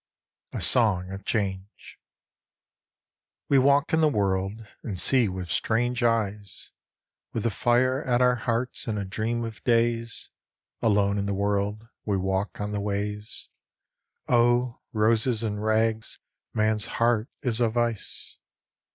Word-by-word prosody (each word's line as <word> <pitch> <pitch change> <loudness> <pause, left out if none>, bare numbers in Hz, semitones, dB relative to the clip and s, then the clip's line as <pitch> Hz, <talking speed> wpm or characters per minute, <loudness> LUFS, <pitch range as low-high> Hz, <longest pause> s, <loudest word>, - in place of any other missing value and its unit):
60 - - -3
A - - -4
Song 95 -7 +2
of 95 0 -8
Change 100 -2 -3 1.5
WE 140 - +5
walk 140 +3 +3
in 160 - +4
the 155 - +5
world, 100 -1 -1 0.2
and 100 -6 -4
see 125 0 +4
with 90 -1 -5
strange 120 +2 0
eyes, 105 -4 -1 0.6
With 110 - -2
the 115 - +1
fire 125 +5 +2
at 125 -2 +1
our 125 0 +4
hearts, 120 +1 -2
and 110 -2 -1
a 100 - -3
dream 115 +4 -2
of 110 -3 -7
days; 115 -1 0 0.5
Alone 100 -2 +2
in 100 - -2
the 100 - -1
world, 100 +2 -1 0.2
we 100 -2 0
walk 95 +2 -2
on 105 0 -3
the 105 -1 -2
ways 105 +1 -4 0.8
(Oh, 120 0 +2
roses 115 +1 +1
and 105 -1 -2
rags, 110 0 0 0.3
man's 110 0 +1
heart 115 -1 +2
is 120 -4 -1
of 115 0 +1
ice 120 -3 -2
110 Hz, 140 wpm, -26 LUFS, 100-120 Hz, 1.5 s, WE